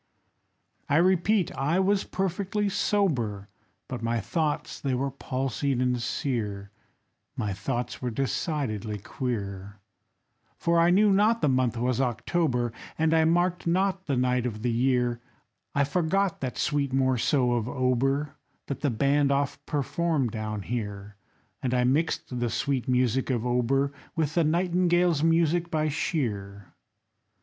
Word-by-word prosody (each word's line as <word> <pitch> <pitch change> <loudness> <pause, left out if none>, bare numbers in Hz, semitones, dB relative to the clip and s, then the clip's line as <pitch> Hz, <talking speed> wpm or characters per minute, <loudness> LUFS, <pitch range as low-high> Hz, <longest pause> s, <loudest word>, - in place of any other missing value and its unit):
I 145 - +3
repeat, 185 +2 +3
I 150 +7 +1
was 195 +1 +2
perfectly 195 +2 -1
sober, 120 - 0 0.4
But 125 -2 -5
my 115 0 0
thoughts 150 - -2
they 135 -2 0
were 135 +2 -1
palsied 135 0 -2
and 125 -1 +1
sear, 105 -6 -3 0.6
My 105 -2 -2
thoughts 120 +6 -3
were 125 - -1
decidedly 120 - -2
queer; 100 -4 -5 0.8
For 170 0 +2
I 170 +1 +5
knew 200 +3 +5
not 215 +4 +3
the 150 - +4
month 130 -3 +1
was 125 +2 0
October, 125 0 0 0.2
And 160 0 +2
I 160 0 +4
marked 175 +2 +1
not 190 +2 +1
the 140 -3 0
night 125 0 +1
of 110 -2 -6
the 120 - +1
year; 120 0 +1 0.5
I 140 - +4
forgot 180 +5 0
that 130 -2 -3
sweet 145 -2 0
morceau 130 0 +2
of 120 -1 0
Auber 135 +4 0 0.3
That 140 -2 -4
the 145 - +2
band 140 +4 +2
oft 140 0 -1
performed 150 -2 0
down 110 -2 -4
here, 105 -3 -5 0.5
And 125 -1 0
I 125 - +3
mixed 130 -1 0
the 120 -1 0
sweet 135 +1 -1
music 125 0 +1
of 120 -2 0
Auber 125 +3 +1 0.2
With 155 -3 0
the 170 - +3
Nightingale's 175 0 +2
music 165 +1 +2
by 155 -1 0
Shear. 100 - -3
135 Hz, 140 wpm, -27 LUFS, 120-165 Hz, 0.8 s, I